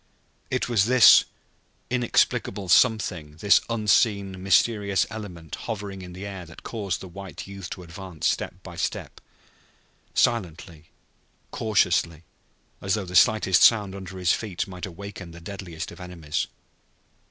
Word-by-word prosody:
It -, -, -1 dB
was 110 Hz, -5 st, +3 dB
this 125 Hz, 0 st, +7 dB, 0.7 s
inexplicable 120 Hz, -5 st, +1 dB
something 90 Hz, -9 st, +2 dB
this 100 Hz, +5 st, +4 dB
unseen, 105 Hz, -4 st, +1 dB
mysterious 100 Hz, 0 st, +2 dB
element 90 Hz, -8 st, -8 dB, 0.2 s
hovering 100 Hz, -3 st, -5 dB
in 90 Hz, -1 st, -9 dB
the 95 Hz, +3 st, -7 dB
air 100 Hz, -2 st, -6 dB
that 80 Hz, -, -14 dB
caused 100 Hz, -6 st, -3 dB
the 95 Hz, -, -8 dB
white 95 Hz, -2 st, -9 dB
youth 100 Hz, -2 st, -8 dB
to 90 Hz, -, -7 dB
advance 85 Hz, -1 st, -8 dB
step -, -, -1 dB
by -, -, -10 dB
step, -, -, -4 dB, 0.9 s
silently, 85 Hz, -8 st, -1 dB, 0.7 s
cautiously, 90 Hz, -6 st, +1 dB, 0.6 s
as 95 Hz, +1 st, +1 dB
though 105 Hz, -3 st, -3 dB
the 90 Hz, 0 st, -7 dB
slightest 95 Hz, -3 st, +5 dB
sound 105 Hz, -4 st, +5 dB
under 95 Hz, -1 st, -8 dB
his 90 Hz, -1 st, +2 dB
feet 100 Hz, -5 st, -3 dB
might 90 Hz, 0 st, -7 dB
awaken 95 Hz, -1 st, -9 dB
the 85 Hz, -, -11 dB
deadliest 85 Hz, -3 st, -7 dB
of -, -, -13 dB
enemies. 85 Hz, -4 st, -4 dB
95 Hz, 135 wpm, -25 LUFS, 90-105 Hz, 0.9 s, this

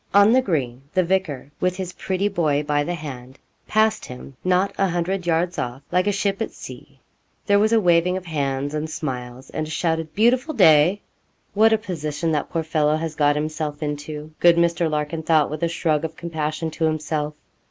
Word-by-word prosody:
On 205 Hz, +3 st, +7 dB
the 260 Hz, -, +5 dB
green 135 Hz, -, -2 dB
the 185 Hz, -, +4 dB
vicar, 170 Hz, -7 st, -1 dB
with 180 Hz, 0 st, 0 dB
his 185 Hz, -1 st, -5 dB
pretty 190 Hz, +1 st, -1 dB
boy 155 Hz, -7 st, +1 dB
by 145 Hz, 0 st, +1 dB
the 175 Hz, +4 st, -3 dB
hand, 135 Hz, -4 st, -8 dB, 0.3 s
passed 215 Hz, 0 st, +2 dB
him, 125 Hz, +2 st, -10 dB
not 185 Hz, +2 st, +2 dB
a 195 Hz, -, +2 dB
hundred 175 Hz, +1 st, -2 dB
yards 170 Hz, +1 st, +1 dB
off, 125 Hz, +3 st, -4 dB
like 180 Hz, +2 st, +2 dB
a -, -, +3 dB
ship 200 Hz, +1 st, -1 dB
at -, -, -1 dB
sea. -, -, -12 dB, 0.5 s
There 200 Hz, -1 st, +4 dB
was 215 Hz, +2 st, +3 dB
a 230 Hz, -, +5 dB
waving 180 Hz, -1 st, +3 dB
of 185 Hz, -, -8 dB
hands, 140 Hz, -3 st, -2 dB
and 155 Hz, +1 st, -3 dB
smiles, 130 Hz, -4 st, -6 dB
and 155 Hz, -, -3 dB
a -, -, -9 dB
shouted 160 Hz, 0 st, -2 dB
'beautiful 250 Hz, +7 st, +2 dB
day.' 175 Hz, 0 st, +5 dB, 0.5 s
'What 220 Hz, +2 st, +5 dB
a 220 Hz, -, +4 dB
position 165 Hz, -6 st, -3 dB
that 150 Hz, -, -1 dB
poor 165 Hz, -, -2 dB
fellow 155 Hz, -1 st, +1 dB
has 160 Hz, 0 st, -3 dB
got 145 Hz, -1 st, +2 dB
himself 155 Hz, 0 st, -3 dB
into!' 150 Hz, +1 st, -5 dB
good 175 Hz, -1 st, +6 dB
Mr. 170 Hz, 0 st, +2 dB
Larkin 150 Hz, +1 st, -2 dB
thought, 155 Hz, -2 st, +2 dB
with 155 Hz, -, -5 dB
a 170 Hz, -, +2 dB
shrug 160 Hz, -2 st, 0 dB
of 160 Hz, 0 st, -4 dB
compassion, 160 Hz, -1 st, -3 dB
to 160 Hz, +1 st, -1 dB
himself. 155 Hz, -1 st, -2 dB
160 Hz, 195 wpm, -22 LUFS, 150-185 Hz, 0.5 s, On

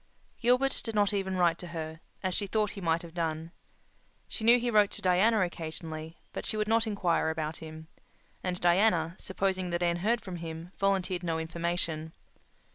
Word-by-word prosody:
Gilbert 250 Hz, +3 st, +3 dB
did 225 Hz, -2 st, -4 dB
not 205 Hz, 0 st, +3 dB
even 190 Hz, -1 st, -1 dB
write 170 Hz, -2 st, +3 dB
to 180 Hz, -, -7 dB
her, 160 Hz, -1 st, -5 dB, 0.2 s
as 185 Hz, -1 st, +1 dB
she 200 Hz, +2 st, 0 dB
thought 210 Hz, +1 st, +1 dB
he 200 Hz, -, -8 dB
might 165 Hz, -1 st, +1 dB
have 165 Hz, -1 st, -10 dB
done. 165 Hz, -1 st, -2 dB, 0.8 s
She 220 Hz, -, -5 dB
knew 235 Hz, +2 st, +7 dB
he 240 Hz, 0 st, 0 dB
wrote 210 Hz, -2 st, +5 dB
to -, -, -5 dB
Diana 190 Hz, +4 st, +4 dB
occasionally, 160 Hz, -2 st, -4 dB, 0.2 s
but -, -, -4 dB
she 215 Hz, -, -1 dB
would 215 Hz, 0 st, 0 dB
not 225 Hz, +1 st, +3 dB
inquire 180 Hz, -6 st, +1 dB
about 160 Hz, 0 st, -2 dB
him; 160 Hz, 0 st, -9 dB, 0.6 s
and 180 Hz, -1 st, -1 dB
Diana, 175 Hz, -2 st, +3 dB
supposing 190 Hz, -1 st, -1 dB
that 175 Hz, 0 st, -1 dB
Anne 170 Hz, 0 st, +2 dB
heard 225 Hz, +6 st, +1 dB
from 185 Hz, -2 st, -6 dB
him, 165 Hz, +1 st, -7 dB
volunteered 190 Hz, -2 st, +1 dB
no 165 Hz, -2 st, -1 dB
information. 160 Hz, -1 st, -2 dB
175 Hz, 185 wpm, -30 LUFS, 165-205 Hz, 0.8 s, knew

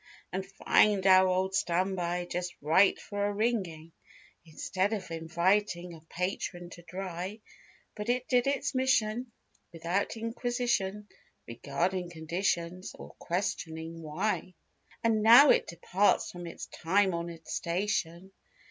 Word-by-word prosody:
And 190 Hz, +1 st, -1 dB
find 195 Hz, 0 st, +2 dB
our 190 Hz, 0 st, +7 dB
old 185 Hz, +1 st, 0 dB
standby 180 Hz, -1 st, 0 dB
just 175 Hz, 0 st, -4 dB
right 165 Hz, +7 st, +4 dB
for 205 Hz, -1 st, -2 dB
a -, -, -1 dB
wringing. 190 Hz, -8 st, -1 dB, 0.5 s
Instead 185 Hz, +5 st, -2 dB
of 190 Hz, -5 st, -5 dB
inviting 175 Hz, +2 st, 0 dB
a 160 Hz, -, -12 dB
patron 175 Hz, -1 st, -4 dB
to 175 Hz, -, -11 dB
dry; 185 Hz, +3 st, -6 dB, 0.6 s
But 210 Hz, +1 st, -5 dB
it 250 Hz, +1 st, 0 dB
did 250 Hz, 0 st, +2 dB
its 280 Hz, 0 st, 0 dB
mission 245 Hz, -2 st, +1 dB, 0.4 s
without 170 Hz, +6 st, -2 dB
inquisition 230 Hz, -3 st, -2 dB, 0.4 s
Regarding 175 Hz, +9 st, -2 dB
conditions 170 Hz, +2 st, -2 dB
or -, -, -11 dB
questioning 165 Hz, -2 st, -3 dB
why. 175 Hz, +4 st, -2 dB, 0.5 s
And 225 Hz, -2 st, +2 dB
now 240 Hz, +6 st, +9 dB
it -, -, +2 dB
departs 185 Hz, +4 st, +1 dB
from 175 Hz, -1 st, -8 dB
its 165 Hz, -, -7 dB
time 190 Hz, +3 st, +1 dB
honored 170 Hz, -1 st, -6 dB
station. 175 Hz, 0 st, -2 dB
185 Hz, 120 wpm, -30 LUFS, 170-210 Hz, 0.6 s, now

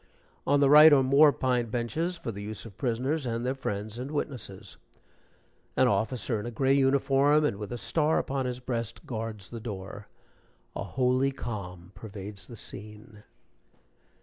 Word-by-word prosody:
On 145 Hz, 0 st, +4 dB
the 140 Hz, -, +5 dB
right 150 Hz, +1 st, +10 dB
are 140 Hz, -2 st, +6 dB
more 140 Hz, +3 st, +6 dB
pine 125 Hz, -4 st, 0 dB
benches, 155 Hz, +10 st, -2 dB
for 115 Hz, -, -5 dB
the 100 Hz, -1 st, -8 dB
use 105 Hz, +1 st, -6 dB
of 105 Hz, -5 st, -11 dB
prisoners, 130 Hz, +5 st, -1 dB
and 115 Hz, +1 st, -2 dB
their 130 Hz, -, 0 dB
friends 110 Hz, -3 st, -4 dB
and 130 Hz, +2 st, -5 dB
witnesses. 130 Hz, -9 st, -5 dB, 1.0 s
An 130 Hz, -, +5 dB
officer, 110 Hz, +2 st, 0 dB
in 105 Hz, -, -5 dB
a -, -, -2 dB
gray 130 Hz, +3 st, +1 dB
uniform, 140 Hz, +2 st, +3 dB
and 100 Hz, -, 0 dB
with 105 Hz, +1 st, -7 dB
a 120 Hz, -, -3 dB
star 155 Hz, +5 st, +1 dB
upon 135 Hz, -1 st, -1 dB
his 125 Hz, 0 st, -4 dB
breast, 115 Hz, -2 st, -4 dB
guards 110 Hz, -4 st, -5 dB
the 115 Hz, -, -6 dB
door. 100 Hz, -2 st, -7 dB, 0.7 s
A -, -, -3 dB
holy 130 Hz, +1 st, +1 dB
calm 90 Hz, -8 st, -7 dB
pervades 100 Hz, -1 st, -9 dB
the 120 Hz, -, -10 dB
scene. 105 Hz, 0 st, -10 dB
120 Hz, 165 wpm, -28 LUFS, 105-135 Hz, 1.0 s, right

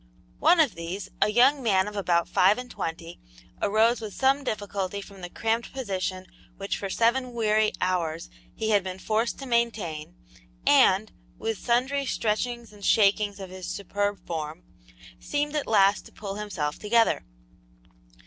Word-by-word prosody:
One 350 Hz, -, +5 dB
of 300 Hz, -7 st, +4 dB
these, 170 Hz, +4 st, -6 dB
a -, -, +4 dB
young 260 Hz, +6 st, +4 dB
man 195 Hz, -5 st, +2 dB
of 210 Hz, -, -7 dB
about 170 Hz, -4 st, +1 dB
five 185 Hz, +3 st, +4 dB
and 250 Hz, 0 st, -7 dB
twenty, 165 Hz, +1 st, -5 dB, 0.4 s
arose 225 Hz, +3 st, +3 dB
with 215 Hz, -3 st, -7 dB
some 275 Hz, +1 st, +2 dB
difficulty 200 Hz, -4 st, -3 dB
from 200 Hz, -1 st, -11 dB
the 175 Hz, -, -6 dB
cramped 225 Hz, +4 st, -2 dB
position 190 Hz, -7 st, -3 dB, 0.3 s
which 195 Hz, 0 st, -3 dB
for 195 Hz, -, -4 dB
seven 245 Hz, +4 st, +1 dB
weary 215 Hz, -2 st, +2 dB
hours 170 Hz, -3 st, -1 dB, 0.2 s
he 220 Hz, 0 st, -1 dB
had 205 Hz, -2 st, +4 dB
been 185 Hz, 0 st, -5 dB
forced 220 Hz, +4 st, -1 dB
to 275 Hz, -, -7 dB
maintain, 225 Hz, -, -1 dB, 0.5 s
and, -, -, +5 dB, 0.3 s
with 225 Hz, -2 st, -3 dB
sundry 265 Hz, +3 st, 0 dB
stretchings 235 Hz, +1 st, -2 dB
and 205 Hz, -1 st, -14 dB
shakings 205 Hz, -1 st, +3 dB
of 190 Hz, -2 st, -8 dB
his 185 Hz, -1 st, -7 dB
superb 205 Hz, -1 st, -2 dB
form, 160 Hz, 0 st, -5 dB, 0.6 s
seemed 290 Hz, +1 st, -2 dB
at 300 Hz, -, -1 dB
last 200 Hz, -2 st, +3 dB
to -, -, -17 dB
pull 200 Hz, -2 st, -6 dB
himself 195 Hz, -8 st, -4 dB
together. 225 Hz, +2 st, +2 dB
210 Hz, 155 wpm, -26 LUFS, 185-235 Hz, 0.6 s, One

